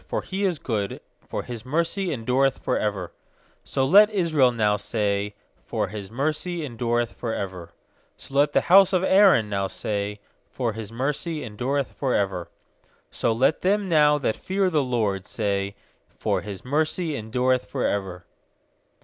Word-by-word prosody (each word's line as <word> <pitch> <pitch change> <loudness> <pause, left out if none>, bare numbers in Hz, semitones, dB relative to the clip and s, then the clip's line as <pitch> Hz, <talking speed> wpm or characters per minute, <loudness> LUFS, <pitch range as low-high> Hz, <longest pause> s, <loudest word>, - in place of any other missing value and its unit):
1X0 - - -28
for - - -1
He 195 +1 -2
is 180 -4 +1
good, 105 -7 -3 0.3
For - - -3
His 120 -3 -7
mercy 170 - -1
endureth 130 +2 +1
for - - -1
ever/ 100 -4 -2 0.6
2So 135 0 0
let 205 +7 +7
Israel 160 - +3
now 105 -3 +2
say, 105 -1 -1 0.3
For 105 -4 -2
His 100 -1 -7
mercy 155 +6 -2
endureth 120 -2 -1
for 115 -2 -4
ever. 90 -3 -5 0.5
8So - - -13
let 145 +1 +3
the - - +2
bouse 195 +1 +7
of 185 0 +2
Aaron 190 - +5
now 100 -1 -1
say, 105 +1 -3 0.3
For 120 -4 -2
His 110 -1 -7
mercy 150 +6 -2
endureth 125 +5 -2
for 135 -3 -1
ever. 95 -4 -1 0.6
4So 115 -1 0
let 140 +4 +3
them 200 +2 +1
now 150 -3 +4
that 130 -6 -1
fear 190 0 0
the* 155 -3 +3
LORD 110 -7 -1
say, 100 -2 -1 0.4
For - - 0
His 100 0 -8
mercy 155 +3 0
endureth 125 0 0
for - - -2
ever. 95 -3 -2
125 Hz, 160 wpm, -24 LUFS, 105-155 Hz, 0.6 s, let